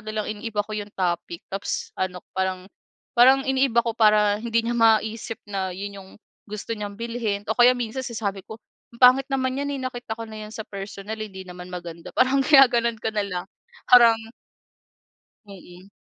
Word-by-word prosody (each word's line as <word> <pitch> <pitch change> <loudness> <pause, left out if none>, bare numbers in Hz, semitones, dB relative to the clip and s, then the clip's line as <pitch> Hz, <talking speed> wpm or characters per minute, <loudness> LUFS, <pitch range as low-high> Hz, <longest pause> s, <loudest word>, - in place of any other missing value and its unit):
nalang 215 0 -3
iniiba 210 0 -3
ko 215 - -10
yung 205 -1 -5
topic 175 -2 -2
tapos 195 +1 -3
ano, 180 -1 -2 0.2
parang 190 -1 -1 0.5
parang 260 +3 +6
iniiba 265 -3 +2
ko 230 - -1
para 210 -2 +4
hindi 230 0 0
niya 235 - 0
maisip 225 0 +2
na 195 -2 -2
yun 200 +1 -7
yung 190 - -16 0.4
gusto 210 +2 -5
niyang 205 -1 -6
bilhin 230 -3 -3
o 220 - 0
kaya 245 +1 +7
minsan 245 +1 -3
sinasabi 210 -5 -3
ko, 220 - -8 0.4
"Ang - - -24
pangit 255 +2 +6
naman 260 -1 -1
yan, 285 - -2
eh, 275 - -5
nakita 245 -3 -5
ko 230 - -5
na 215 -1 -8
yan - - -13
sa 220 - -6
personal. 200 +2 -7
Hindi 190 -3 -7
naman 180 0 -10
maganda," 170 -2 -8
parang 260 +2 +3
ginagano'n 245 -5 +5
ko 220 - -1
nalang 200 -4 -2 0.4
parang 235 -2 +8 1.3
Mm. 185 -1 -14
215 Hz, 170 wpm, -24 LUFS, 195-235 Hz, 1.3 s, parang